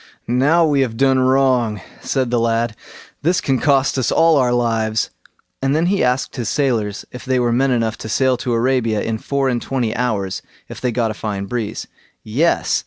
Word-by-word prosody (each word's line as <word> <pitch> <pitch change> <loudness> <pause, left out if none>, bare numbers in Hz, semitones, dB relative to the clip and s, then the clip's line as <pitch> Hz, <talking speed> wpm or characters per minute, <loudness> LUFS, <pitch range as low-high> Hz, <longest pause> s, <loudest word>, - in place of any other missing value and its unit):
"Now 145 +8 +3
we 145 -3 +2
have 115 -4 -1
done 135 0 +3
wrong", 130 -4 +2 0.2
said 130 -3 -1
the 120 - +2
lad; 115 -1 0 0.5
"this 175 +5 +2
can 135 -6 0
cost 135 -1 +2
us 125 - 0
all 165 -1 +4
our 125 -2 +2
lives"; 115 -2 0 0.5
and 135 +1 +1
then 160 +2 +2
he 195 +2 +1
asked 125 +1 0
his 120 -3 -2
sailors 115 -8 -1
if 125 - -9
they 130 -1 0
were 120 -1 +1
men 135 +3 +2
enough 115 -3 0
to 110 - -7
sail 130 +3 +2
to 120 0 -2
Arabia 115 -3 +1
in 110 -1 -2
four 140 +2 -1
and 120 -2 0
twenty 120 -4 -2
hours 105 -7 -2 0.3
if - - -9
they 125 - 0
got 115 -1 0
a - - -4
fine 100 -2 -4
breeze. 110 0 -4 0.4
Yes! 140 +11 +1
125 Hz, 195 wpm, -19 LUFS, 115-135 Hz, 0.5 s, all